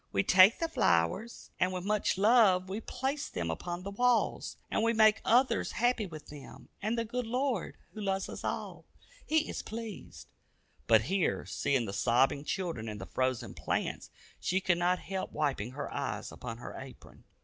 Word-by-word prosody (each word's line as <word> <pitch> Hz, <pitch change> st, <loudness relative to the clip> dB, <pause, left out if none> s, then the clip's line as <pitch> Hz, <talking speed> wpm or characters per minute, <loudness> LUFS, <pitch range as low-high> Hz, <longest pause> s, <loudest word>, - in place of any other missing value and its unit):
We 100 Hz, -1 st, +2 dB
take 185 Hz, +4 st, +7 dB
the 330 Hz, -, -1 dB
flowers, 140 Hz, -, 0 dB
and 185 Hz, +1 st, +2 dB
with 180 Hz, -1 st, -4 dB
much 210 Hz, -2 st, +1 dB
love 200 Hz, -4 st, +5 dB
we 205 Hz, +4 st, -3 dB
place 275 Hz, +5 st, -3 dB
them 85 Hz, -1 st, -3 dB
upon 175 Hz, -, -5 dB
the 200 Hz, -, -5 dB
walls, 245 Hz, +3 st, +1 dB
and -, -, +1 dB
we 230 Hz, +1 st, +2 dB
make 215 Hz, -1 st, +5 dB
others 250 Hz, +3 st, +3 dB
happy 240 Hz, -3 st, +1 dB
with 155 Hz, -3 st, -10 dB
them, 145 Hz, -2 st, -12 dB
and 215 Hz, +4 st, -1 dB
the 230 Hz, -, 0 dB
good 245 Hz, +1 st, -3 dB
Lord, 250 Hz, -4 st, -1 dB, 0.2 s
who 215 Hz, -, -7 dB
loves 195 Hz, -1 st, -1 dB
us -, -, -8 dB
all, -, -, -4 dB, 0.4 s
He 315 Hz, 0 st, +2 dB
is -, -, -4 dB
pleased," 220 Hz, -2 st, -8 dB, 0.6 s
but 110 Hz, -1 st, +6 dB
here, 190 Hz, -, 0 dB
seeing 135 Hz, -4 st, 0 dB
the 100 Hz, -, -5 dB
sobbing 130 Hz, +7 st, +2 dB
children 165 Hz, -, -3 dB
and 105 Hz, -1 st, -6 dB
the 95 Hz, -, -6 dB
frozen 130 Hz, +1 st, -1 dB
plants, -, -, -3 dB, 0.3 s
she 185 Hz, -, 0 dB
could 175 Hz, -2 st, +1 dB
not 180 Hz, +1 st, +2 dB
help 190 Hz, 0 st, -5 dB
wiping 130 Hz, -6 st, -1 dB
her 140 Hz, -, -5 dB
eyes -, -, -3 dB
upon 115 Hz, -2 st, -7 dB
her 120 Hz, -, -8 dB
apron. -, -, -12 dB
190 Hz, 180 wpm, -31 LUFS, 140-225 Hz, 0.6 s, take